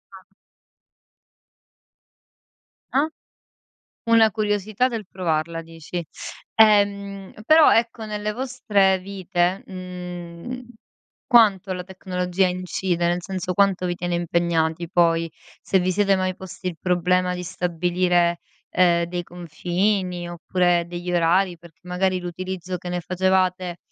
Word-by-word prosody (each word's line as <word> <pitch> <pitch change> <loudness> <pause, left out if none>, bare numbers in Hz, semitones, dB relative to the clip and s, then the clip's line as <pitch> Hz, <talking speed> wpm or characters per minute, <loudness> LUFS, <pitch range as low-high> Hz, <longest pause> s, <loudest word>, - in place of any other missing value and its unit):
Ah. 190 - -13 2.7
Ah. 280 +3 +2 1.0
Una 225 -1 +6
curiosità 210 +2 0
del 230 -4 -4
provarla 165 -2 -2
dici. 165 +1 -7 0.5
Ehm, 200 -2 +3
però 310 +4 +7
ecco, 230 -1 0
nelle 210 0 -3
vostre 210 -6 +1
vite, 185 -1 -1
mhmm, 180 +4 -7 0.6
quanto 205 -6 +4
la 180 -1 -4
tecnologia 185 0 -1
incide? 180 -1 -1
Nel 175 +1 0
senso, 185 -1 -3
quanto 195 -1 +2
vi 175 0 -2
tiene 175 0 -2
impegnati, 170 -1 0
poi? 165 -1 +2 0.3
Se 190 - +1
vi 185 +1 0
siete 200 0 +3
mai 185 0 -1
posti 185 0 -6
il 170 - -6
problema 180 0 +1
di 180 - -5
stabilire, 175 0 +1 0.3
ehm, 170 -2 +3
dei 175 0 -4
confini 180 +2 -2
oppure 175 0 +1
degli 175 +1 -5
orari? 175 +1 +2
Perché 165 -1 -17
magari, 185 +1 0
l'utilizzo 185 +1 -5
che 180 - -8
ne 180 0 -2
facevate 185 0 0
180 Hz, 115 wpm, -23 LUFS, 175-195 Hz, 2.7 s, però